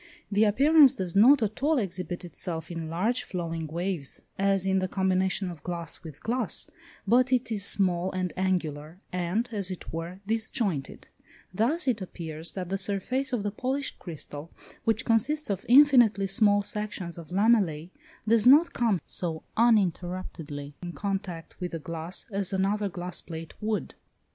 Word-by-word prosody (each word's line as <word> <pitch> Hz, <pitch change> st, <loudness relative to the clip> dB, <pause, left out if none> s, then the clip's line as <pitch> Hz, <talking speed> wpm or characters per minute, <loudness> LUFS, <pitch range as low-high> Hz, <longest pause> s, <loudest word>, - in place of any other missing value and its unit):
The 205 Hz, +2 st, +4 dB
appearance 275 Hz, +5 st, +6 dB
does 185 Hz, -4 st, -3 dB
not 245 Hz, +5 st, +7 dB
at 215 Hz, +3 st, -3 dB
all 305 Hz, +2 st, +3 dB
exhibit 185 Hz, -4 st, -3 dB
itself 165 Hz, -1 st, -4 dB
in 165 Hz, -2 st, -5 dB
large 210 Hz, +10 st, +1 dB
flowing 165 Hz, -3 st, -4 dB
waves, 170 Hz, -2 st, -4 dB
as 195 Hz, -1 st, +1 dB
in 190 Hz, 0 st, +2 dB
the 185 Hz, -, -1 dB
combination 190 Hz, 0 st, 0 dB
of 170 Hz, -, -11 dB
glass 170 Hz, -3 st, -5 dB
with 155 Hz, -3 st, -11 dB
glass, 245 Hz, +3 st, -1 dB, 0.4 s
but 245 Hz, +5 st, +3 dB
it 250 Hz, -2 st, +1 dB
is 205 Hz, -3 st, 0 dB
small 185 Hz, -2 st, +2 dB
and 185 Hz, -3 st, -2 dB
angular, 165 Hz, -4 st, -2 dB, 0.2 s
and, 180 Hz, +6 st, -1 dB
as 200 Hz, -4 st, -3 dB
it 185 Hz, -3 st, -7 dB
were, 170 Hz, +3 st, -5 dB
disjointed: 220 Hz, -, -2 dB, 0.5 s
thus 265 Hz, -, +1 dB
it 230 Hz, -5 st, +1 dB
appears 165 Hz, -3 st, -5 dB
that 180 Hz, -2 st, -5 dB
the 195 Hz, +1 st, -1 dB
surface 210 Hz, +8 st, -1 dB
of 240 Hz, -5 st, -1 dB
the 205 Hz, -, -1 dB
polished 265 Hz, +6 st, -2 dB
crystal, 155 Hz, -2 st, -8 dB, 0.4 s
which 225 Hz, +2 st, +1 dB
consists 250 Hz, +4 st, +1 dB
of 195 Hz, -1 st, -4 dB
infinitely 245 Hz, -7 st, +6 dB
small 205 Hz, +1 st, +3 dB
sections 200 Hz, -5 st, -4 dB
of 165 Hz, -, -11 dB
lamellæ, 185 Hz, -5 st, +2 dB, 0.4 s
does 225 Hz, +1 st, +4 dB
not 300 Hz, +6 st, +7 dB
come 225 Hz, -6 st, +1 dB
so 165 Hz, -3 st, -4 dB
uninterruptedly 180 Hz, -9 st, 0 dB
in 175 Hz, -1 st, -6 dB
contact 190 Hz, -1 st, -4 dB
with 180 Hz, -1 st, -4 dB
the -, -, -1 dB
glass 165 Hz, +3 st, -5 dB
as 195 Hz, -2 st, 0 dB
another 200 Hz, +2 st, 0 dB
glass 180 Hz, 0 st, -5 dB
plate 165 Hz, -1 st, -8 dB
would. 215 Hz, 0 st, -2 dB
190 Hz, 160 wpm, -27 LUFS, 170-220 Hz, 0.5 s, not